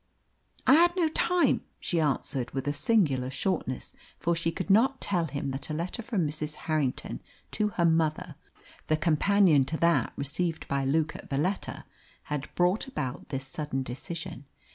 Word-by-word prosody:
"I - - +7
had 345 +3 +6
no 340 -4 +2
time," 350 +2 +2 0.2
she 170 - -1
answered, 135 -4 0
with 135 +1 -2
a 145 - +1
singular 145 - +2
shortness, 135 -3 -2 0.2
for 170 0 0
she 165 0 0
could 185 +3 -2
not 260 +6 +4
tell 175 -4 0
him 140 -3 -3
that 135 +3 -4
a 155 - -2
letter 175 +8 -3
from 210 -8 0
Mrs. 150 0 -4
Harrington 155 -5 -1 0.3
to 210 - +1
her 170 - +3
mother 160 -2 +1 0.5
the 155 - +2
companion 165 0 +4
to 160 +4 -2
that 170 +1 +2
received 160 +4 -1
by 140 0 0
Luke 155 +3 +1
at - - -10
Valetta 165 +8 -2 0.4
had 150 -1 -4
brought 180 +8 +2
about 135 - -5
this 135 -1 -2
sudden 135 -1 -3
decision. 160 +4 -5
160 Hz, 165 wpm, -28 LUFS, 140-185 Hz, 0.5 s, I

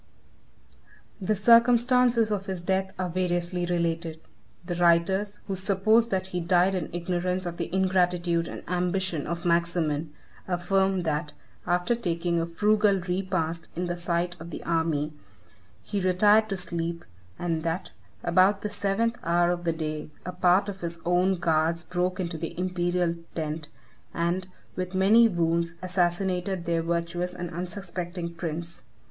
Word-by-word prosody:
The 210 +3 +1
circumstances 235 +1 +5
of 200 -1 -2
his 185 -3 -4
death 190 +1 0
are 185 -1 -1
variously 175 0 -1
related. 170 -2 -1 0.5
The 175 - -3
writers, 175 +4 +2
who 195 - -3
suppose 205 +4 +3
that 190 -1 0
he 180 - 0
died 180 +2 +3
in 180 -4 -2
ignorance 180 +1 -2
of 170 -1 -4
the 170 -1 -4
ingratitude 180 -2 +1
and - - -7
ambition 180 -2 -1
of 170 +3 -4
Maximin 170 -3 +1 0.4
affirm 190 +1 +1
that, 150 -1 -2 0.3
after 180 +6 +2
taking 170 -6 -1
a 165 - -2
frugal 210 +3 +3
repast 180 -2 -2
in 180 +2 -2
the 175 0 -2
sight 175 0 -1
of 165 +1 -8
the 160 - -7
army, 160 -2 0 0.7
he 205 -2 -2
retired 205 +4 +4
to 195 - -2
sleep, 170 -1 -3 0.3
and 165 -2 -1
that, 165 +3 -3 0.3
about 185 +3 +3
the 210 - -1
seventh 205 +4 0
hour 175 +1 +2
of 175 0 -3
the 165 - +2
day, 155 -2 -4 0.2
a 180 - -3
part 180 +2 +3
of 195 -2 -6
his 170 -1 -4
own 180 +2 +3
guards 165 0 +1
broke 180 +2 -1
into 170 -3 -3
the 165 +1 -5
imperial 175 -1 0 0.2
tent, 155 -1 -3 0.5
and, 175 +2 0 0.3
with 185 0 -4
many 215 +5 +6
wounds, 170 -3 0
assassinated 180 0 0
their 170 -1 +1
virtuous 170 +2 -2
and 175 -1 -5
unsuspecting 175 -1 -5
prince. 170 0 -5
175 Hz, 145 wpm, -27 LUFS, 170-190 Hz, 0.7 s, many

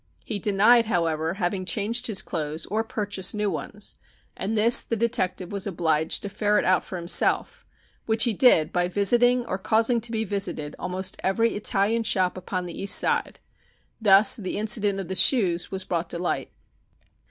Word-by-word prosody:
He 205 - -4
denied, 215 +3 +3
however, 165 -3 -1
having 185 -1 -2
changed 215 +5 -2
his 195 -4 -1
clothes 155 -1 -4
or 220 +2 0
purchased 205 -5 -2
new 210 -1 -1
ones, 200 +6 -4 0.4
and 220 +3 -3
this 230 +3 +6
the 230 - -3
detective 200 -6 -2
was 200 0 -2
obliged 160 -4 0
to 200 - -5
ferret 210 +1 0
out 185 0 +2
for 185 - -7
himself, 170 0 +1 0.4
which 220 0 +2
he 235 - +1
did 195 -8 +3
by 175 0 0
visiting 240 +6 +2
or 190 -4 -4
causing 225 +3 +1
to 235 +1 -4
be 220 -1 -2
visited 195 -7 -3
almost 185 +1 -4
every 225 +5 0
Italian 210 +2 0
shop 190 -5 0
upon 185 0 -5
the 175 +1 -8
East 200 - +4
Side. - - +2 0.6
Thus 200 -1 +5
the 190 -5 -5
incident 205 -2 +1
of 190 - -6
the 190 - -4
shoes 185 -3 +2
was 190 -1 -4
brought 170 -2 -3
to - - -4
light. 175 +1 -3
200 Hz, 175 wpm, -24 LUFS, 180-220 Hz, 0.6 s, this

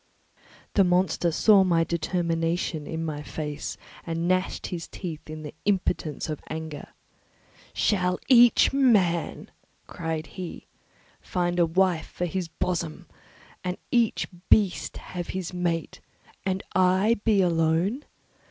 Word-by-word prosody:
The 200 - +5
monster 180 -1 +2
saw 200 +4 +5
my 170 -3 +3
determination 165 -1 -1
in 160 0 -3
my 150 -2 -4
face 150 -1 -5 0.3
and 165 0 -2
gnashed 185 +1 0
his 170 -2 -5
teeth 160 -5 -7
in 155 0 -7
the 150 - -7
impotence 180 -6 0
of 155 -2 -4
anger. 160 -1 -6 0.8
"Shall 180 -3 +1
each 245 -1 +6
man," 205 - +2 0.3
cried 160 -1 -4
he, 180 -1 -8 0.6
"find 175 -2 -1
a 170 - +4
wife 175 -1 +1
for 180 - -3
his 180 0 -3
bosom, 160 - -3 0.6
and 180 0 -2
each 235 -2 +2 0.2
beast 200 -4 +3
have 175 -1 -6
his 185 -1 -4
mate, 170 -2 -2 0.5
and 190 0 -1
I 185 +5 +3
be 210 -4 +4
alone? 170 - +1
175 Hz, 125 wpm, -26 LUFS, 165-190 Hz, 0.8 s, each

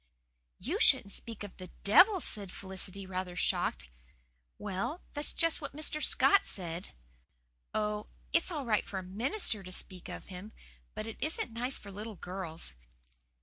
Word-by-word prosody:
'" - - -47
"You - - +1
shouldn't 200 - +5
speak 225 -1 -6
of 205 - -8
the 185 - -8
the - - -19
DEVIL," 370 - +7
said 200 -8 -2
Felicity, 190 0 -3
rather 185 -1 -3
shocked. 65 - 0 0.7
"Well, 205 - -3
that's 290 0 +4
just 330 -1 +2
what 285 - -6
Mr. 305 0 0
Scott 400 - +5
said." 175 -1 -4 0.8
"Oh, 210 0 0 0.3
it's 335 +2 +3
all 300 -6 -3
right 215 -3 +3
for 195 - -5
a 190 - -3
MINISTER 220 - +2
to 185 -1 -9
speak 185 0 -4
of - - -6
him. 190 +3 -8 0.4
But - - -3
it 225 - -6
isn't 310 -6 -1
nice 245 +3 -1
for 200 - -10
little 210 +2 -6
girls. 175 - -6
205 Hz, 165 wpm, -33 LUFS, 185-245 Hz, 0.8 s, DEVIL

